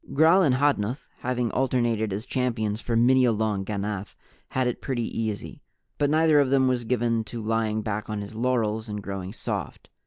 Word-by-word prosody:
Gral 160 +6 +6
and 140 -8 +3
Hodnuth, 130 -3 0
having 125 -2 -1
alternated 120 -5 +1
as 105 +4 -4
champions 115 -4 -1
for 115 - -2
many 130 +3 +5
a 120 - +4
long 105 -2 0
ganath, 100 0 -4 0.3
had 130 0 0
it 125 - -2
pretty 120 -4 -2
easy. 110 -2 -4 0.4
But 145 - +2
neither 155 0 +4
of 140 -2 +3
them 135 -1 +3
was 125 -2 0
given 115 -1 +1
to 120 - -7
lying 110 -1 0
back 105 0 -3
on 105 -1 -3
his 100 +1 -8
laurels 110 -2 0
and 105 -1 -5
growing 100 -1 -5
soft. 105 - -5
115 Hz, 185 wpm, -26 LUFS, 105-130 Hz, 0.4 s, Gral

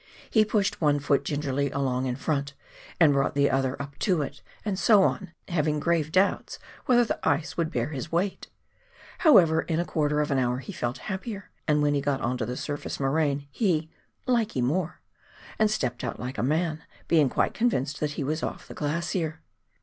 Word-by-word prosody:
He 220 - +5
pushed 205 -3 0
one 145 -2 +4
foot 140 0 +1
gingerly 140 -1 -1
along 130 -1 -1
in 125 - -1
front, 140 0 -2 0.4
and 155 -4 +6
brought 140 0 +1
the 140 0 +3
other 135 0 0
up 140 -1 -7
to 180 -7 +2
it, 140 - -8 0.2
and 195 -3 -1
so 205 -3 +6
on, 190 -2 -1 0.2
having 150 -4 0
grave 160 -1 +1
doubts 190 +3 +1 0.3
whether 245 -2 +5
the - - -2
ice 150 +1 0
would 165 -2 0
bear 120 +3 -1
his 150 +1 -5
weight! 185 +4 -1 0.7
However, 170 - +6
in 165 -1 -1
a 175 - 0
quarter 150 -2 0
of 150 -1 0
an 135 - +2
hour 125 -1 +1
he 135 - -7
felt 120 -7 -3
happier, 200 +1 -5 0.2
and 150 -1 +3
when 145 0 +3
we 140 - +1
got 140 -1 0
on 125 0 -1
to 110 - -2
the 125 +1 -4
surface 145 -1 -4
moraine 140 0 0
he 160 - 0 0.2
" - - -41
likee 220 - 0
more," 160 +6 -1 0.6
and 215 0 +4
stepped 125 - -2
out 120 - -4
like 125 0 -5
a - - +1
man, 155 +4 0 0.3
being 155 -5 +4
quite - - +1
convinced 145 - 0
that 150 -1 -1
he 150 - -3
was 155 +4 -1
off - - -5
the - - -9
glacier. 160 +1 -2
150 Hz, 200 wpm, -27 LUFS, 140-170 Hz, 0.7 s, and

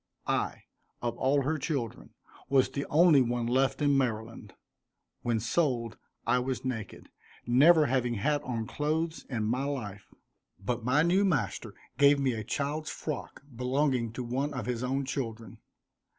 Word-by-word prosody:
I, - - -1 0.4
of 120 -1 -1
all 140 +1 +2
her 155 +3 -1
children, 135 -6 -4 0.3
was 135 -1 +4
the 140 - -3
only 155 -2 +6
one 120 -1 0
left 130 +4 +1
in 145 -1 +4
Maryland. 115 -4 -2 0.7
When 120 -2 0
sold 120 -1 0 0.3
I 125 - +3
was 130 +1 -3
naked, 115 -5 -5 0.4
never 150 +6 +6
having 125 -2 0
had 145 +8 +1
on 115 -3 -3
clothes 160 +5 -2
in 120 -5 -2
my 125 +5 0
life, 105 -8 -5 0.5
but 120 +4 -3
my 130 +6 +3
new 180 +4 +3
master 135 - -1 0.2
gave 140 0 +6
me 135 -2 +1
a 110 -1 -4
child's 145 +7 -2
frock, 145 -2 -6
belonging 125 -1 0
to 125 - -4
one 135 +4 -2
of 120 -4 -3
his 120 -1 -2
own 135 +2 -1
children. 115 -6 -5
130 Hz, 150 wpm, -29 LUFS, 115-145 Hz, 0.7 s, only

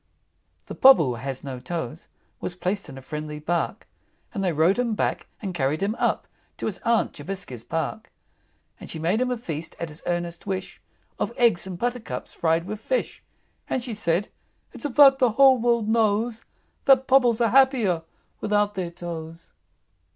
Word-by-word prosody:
VI. - - -45
The - - -8
Pobble 265 - +8
who - - -1
has 135 +1 -5
no 135 -3 -6
toes 165 0 -5 0.3
Was 175 - -4
placed 185 +1 -2
in 135 - -9
a 135 - -10
friendly 150 +2 -5
Bark, 165 +3 -2 0.5
And 200 -4 -2
they 180 - +2
rowed 165 +8 +3
him 235 -3 0
back, - - -1 0.2
and 190 -2 -3
carried 150 +2 0
him 205 +2 +1
up - - 0 0.3
To - - -4
his 210 - -2
Aunt 230 -1 +1
Jobiska's 150 - -5
Park. 165 - -4 0.7
And - - -10
she - - -5
made 175 +9 +1
him 255 - +1
a 250 - -1
feast, 160 -7 -6
at 170 - -4
his 150 +1 -11
earnest 175 +1 -3
wish, 190 -1 -4 0.4
Of - - -1
eggs 225 -7 +3
and 185 -2 -6
buttercups 245 +2 -4
fried 165 0 +1
with 210 +2 -6
fish; - - -2 0.5
And 255 - -1
she 240 -2 -3
said, 185 -1 0 0.4
"It's - - -7
a 290 - -1
fact 270 0 +7
the 250 -5 +3
whole 265 +1 +6
world 235 -2 +2
knows, 220 +1 +1 0.4
That 265 -3 +6
Pobbles 250 -4 +4
are 230 -1 +3
happier 245 -9 +4 0.4
without 210 0 +1
their 185 -3 -3
toes." 165 -1 -8
195 Hz, 180 wpm, -25 LUFS, 165-235 Hz, 0.7 s, Pobble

